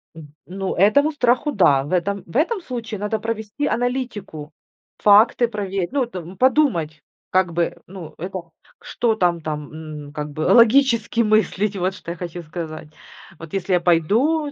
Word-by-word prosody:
М, 150 -3 -12
ну 190 +1 -4
этому 285 - +4
страху 255 +1 +1
да. 145 - +3
В 145 - -8
этом, 200 +2 -1
в 165 - -15
этом 375 +6 +1
случае 235 - -6
надо 210 +1 -2
провести 220 +4 -4
аналитику, 235 - -3 0.5
факты 215 +4 +5
проверить, 195 -4 -3
ну 275 -1 +1
это 235 -7 -6
подумать, 190 - +1 0.3
как 185 -2 +1
бы, 170 0 -1
ну 180 -3 -10
это, 185 +3 -5 0.4
что 230 -2 -1
там 175 -4 +1
там 150 -2 -5 0.4
н 145 - -14
как 150 -1 -5
бы 155 - -6
логически 235 - +4
мыслить, 210 -2 +1
вот 185 +1 -1
что 170 -2 -8
я 175 - -7
хочу 175 0 -6
сказать. 155 -1 -7 0.5
Вот 165 -1 -11
если 195 -1 -1
я 180 - +4
пойду, 225 - +2
195 Hz, 160 wpm, -21 LUFS, 170-235 Hz, 0.5 s, факты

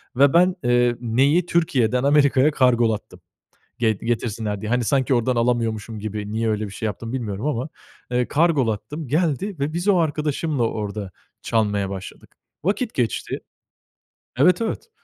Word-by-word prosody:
ve 140 +2 +5
ben, 180 +2 +4
ııı, 120 0 +3
neyi 135 +9 +2
Türkiye'den 130 -8 +1
Amerika'ya 140 0 +4
kargolattım 120 -6 +1 0.6
ge 115 -2 +3
getirsinler 110 -1 -3
diye. 105 - -4
Hani 125 0 +2
sanki 135 +2 +1
ordan 125 +1 +1
alamıyormuşum 115 -2 -1
gibi. 105 0 -5
Niye 110 +1 0
öyle 105 0 -1
bir - - -10
şey 110 - -5
yaptım, 115 +3 -4
bilmiyorum 110 -3 -3
ama, 140 -1 -2 0.4
ııı, 125 0 +1
kargolattım. 145 -3 0
Geldi 170 +7 0
ve 145 +3 -1
biz 175 +4 -3
o 200 -3 +5
arkadaşımla 150 -3 0
orda 105 -3 -3 0.3
çalmaya 105 -3 0
başladık. 95 -1 -9 0.3
Vakit 205 +7 -1
geçti. 120 -3 -2 1.0
Evet, 180 - +4
evet. 230 - -3
125 Hz, 145 wpm, -22 LUFS, 110-150 Hz, 1.0 s, ve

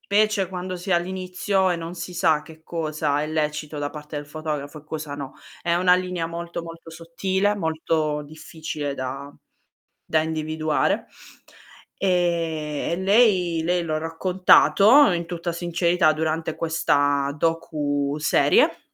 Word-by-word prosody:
specie 205 -2 +1
quando 185 0 -5
si 180 +2 -9
è 190 - +4
all'inizio 185 +2 0
e 175 - +1
non 165 +1 -6
si 180 0 -7
sa 160 -3 +3
che 160 +1 -15
cosa 155 -3 -1
è 150 - -2
lecito 155 -1 -2
da 145 0 -2
parte 150 0 -8
del 145 - -4
fotografo 150 -1 -5
e - - -25
cosa 155 -2 -5
no. 140 -2 -7 0.3
È 170 -1 0
una 180 +1 +4
linea 180 -2 -2
molto, 170 0 -5
molto 165 0 -11
sottile, 185 +5 -1
molto 160 -4 -1
difficile 155 -1 -6
da 135 +2 -5 0.8
da 155 -1 +3
individuare. 155 -1 0 1.0
Ehm, 165 -5 0
e - - 0
lei 190 -5 +3
lei 175 +1 +1
l'ho 155 -2 -2
raccontato 190 - +5
in 170 -1 -1
tutta 170 0 -4
sincerità 175 -1 +2
durante 160 +1 -2
questa 145 -3 +1
docu-serie. 150 -2 +1
165 Hz, 135 wpm, -23 LUFS, 155-180 Hz, 1.0 s, raccontato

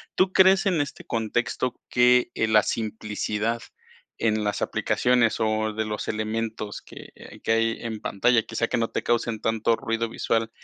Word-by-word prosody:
¿tú 185 0 +3
crees 190 +1 +5
en 175 -5 +2
este 145 -1 -4
contexto 115 +2 -2
que, 125 0 +4
eh, 110 - 0
la 110 -1 +5
simplicidad 110 +1 -2 0.6
en 110 -2 +1
las 105 - -1
aplicaciones 120 -2 +1
o 110 0 0
de 110 - -1
los 105 -1 -4
elementos 110 -1 -3
que - - -12 0.2
hay - - -13
que - - -1
hay 115 0 +1
en 110 -2 -5
pantalla, 115 +3 +2
quizá, 115 0 -2
que - - 0
no 115 -1 0
te - - -3
causen 115 -2 0
tanto 115 0 +1
ruido 115 +1 -2
visual, 115 0 -1
115 Hz, 170 wpm, -25 LUFS, 110-120 Hz, 0.6 s, crees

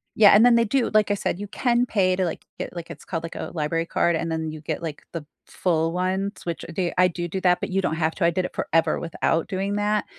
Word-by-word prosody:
Yeah, 210 -2 +7
and 215 +4 +7
then 245 - +6
they 235 - +4
do, 260 +3 +1
like 215 -1 +3
I - - +4
said, 195 -2 -2
you 205 - -5
can 240 +3 +1
pay 185 -5 +2
to, 185 - 0
like 165 - -4
to - - -30
get, - - -5
like 170 -1 -7
it's - - -10
called, 165 -2 -4
like, 165 - -7
a - - -5
library 165 +1 -1
card 170 0 +1
and 165 0 -2
then 160 -1 -2
you 155 - -8
get, 150 - -4
like, 160 -3 -6
the 165 -3 -5 0.2
full 165 -2 0
ones, 190 +3 -2
which 170 -1 -4
th 180 -2 -1
I 180 0 +6
do 175 0 -4
do 190 +3 -3
that, 180 -1 +3
but - - -4
you 195 +1 0
don't 160 - -1
have 160 0 0
to, 185 - 0
I 170 - +4
did 180 +2 -1
it - - -7
forever 165 0 +1
without 165 0 -1
doing 195 +1 -2
that. 210 +1 0
180 Hz, 285 wpm, -24 LUFS, 165-200 Hz, 0.2 s, Yeah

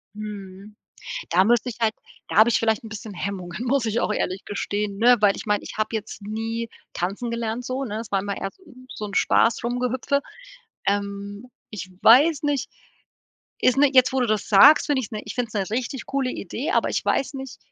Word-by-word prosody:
Mhm. 205 -1 -9 0.5
Da 185 +3 +4
müsste 240 +3 +2
ich 235 - -8
halt 220 -1 +2 0.4
da - - -2
habe 220 +2 +7
ich - - +3
vielleicht 220 -1 0
ein 225 - -9
bisschen 215 -1 -8
Hemmungen, 185 +2 -5
muss 260 -1 +1
ich 225 +2 0
auch - - 0
ehrlich 190 -2 -2
gestehen, 205 0 -3
ne? 240 +3 +6
Weil 205 -2 +4
ich - - -8
mein, 210 -1 +1
ich - - -9
habe 215 - 0
jetzt 215 -1 -5
nie 225 +2 -3 0.3
tanzen 200 +7 -3
gelernt 235 +1 -3
so, 255 +2 -3
ne? 215 -1 -4
Es 230 - -8
war 195 - +2
immer 200 0 -3
eher - - -4
so 380 - -25
'n 255 0 -16
so 215 - -6
'n 200 - -8
Spaß-Rumgehüpfe. 245 +6 +1 0.7
Ähm, 200 +3 -3 0.2
ich 190 -3 -7
weiß 285 +6 +6
nicht, 290 -2 -1 0.9
ist 255 - +3
ne 285 0 +5
jetzt 255 0 +5
wo 265 - +1
du 245 - +2
das 215 -2 0
sagst, 280 +11 +7
ich 290 - +3
finde 260 - 0
es 205 - -7
'ne 215 -1 -4
ich - - -7
finde 245 -2 -1
es 215 - -16 0.2
'ne 225 - 0
richtig 255 0 -4
coole 270 -2 -1
Idee, 255 - -4
aber - - +2
ich - - -2
weiß 275 - 0
nicht, 265 -1 -7
225 Hz, 215 wpm, -24 LUFS, 205-250 Hz, 0.9 s, habe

